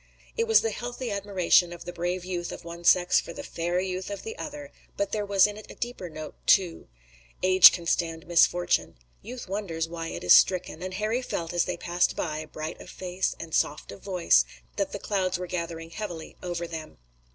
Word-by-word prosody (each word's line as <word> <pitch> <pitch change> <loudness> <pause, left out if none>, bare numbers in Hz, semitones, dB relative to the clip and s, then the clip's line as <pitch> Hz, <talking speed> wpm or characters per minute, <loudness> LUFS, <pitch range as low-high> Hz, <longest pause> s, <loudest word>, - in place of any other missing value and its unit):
It 460 -1 0
was 450 - +6
the 225 - -1
healthy 245 +1 -5
admiration 190 -3 +3
of 175 0 -9
the 175 - -6
brave 175 +1 -2
youth 175 -2 -3
of - - -9
one 170 0 -8
sex 175 +1 +5
for 170 - -7
the - - -7
fair 175 +2 -2
youth 185 0 -3
of 200 - -6
the 450 0 -6
other, 295 - -7 0.3
but 200 - -1
there 210 -2 -2
was 200 -2 +5
in 210 0 -3
it 215 - -11
a - - -10
deeper 240 -7 -5
note, 155 -1 -8
too. 180 -4 +3 0.6
Age 185 0 +9
can 170 - -5
stand 165 -1 -1
misfortune. 175 +1 +2 0.3
Youth 245 +1 -8
wonders 180 -5 -3
why 165 0 -5
it - - -6
is 90 - +7
stricken, 180 -3 +4
and 185 0 -5
Harry 215 +5 0
felt 170 -9 -4
as 175 - +2
they 180 - -3
passed 175 +1 +1
by, 155 -1 -3
bright 155 +1 -7
of - - -11
face 185 0 -2
and 165 -1 -8
soft 150 - 0
of - - -11
voice, 180 - +3 0.3
that - - -1
the - - -4
clouds 185 -3 -1
were 180 - -4
gathering 170 -2 -5
heavily 175 -5 -6
over 175 -1 -3
them. 160 -2 -8
180 Hz, 210 wpm, -27 LUFS, 170-200 Hz, 0.6 s, Age